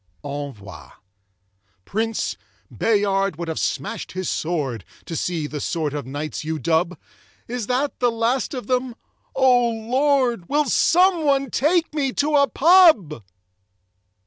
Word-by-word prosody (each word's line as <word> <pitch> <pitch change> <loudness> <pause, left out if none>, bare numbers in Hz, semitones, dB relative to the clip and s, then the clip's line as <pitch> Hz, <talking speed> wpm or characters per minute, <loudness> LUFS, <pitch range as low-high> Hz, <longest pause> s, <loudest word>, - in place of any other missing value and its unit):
Envoi 140 -9 -7 1.0
Prince, 225 +2 -2 0.4
Bayard 200 -4 +1
would 170 +2 -6
have 160 - -3
smashed 145 - -3
his 185 -1 -4
sword 145 - -2 0.2
To 165 - -6
see 165 -1 -2
the 150 0 -5
sort 155 -2 -2
of 145 -4 -5
knights 145 +4 -5
you 160 +1 -3
dub 170 +3 0 0.5
Is 240 -2 -4
that 265 +3 -1
the 245 - +3
last 235 +4 -1
of 250 - -5
them 250 0 -1 0.4
O 250 -2 +4
Lord 240 -2 0
Will 295 +1 +2
someone 305 - +2
take 320 +4 +1
me 280 -4 0
to 300 +1 +1
a 280 -1 +5
pub? 310 - +5
225 Hz, 130 wpm, -22 LUFS, -, 1.0 s, a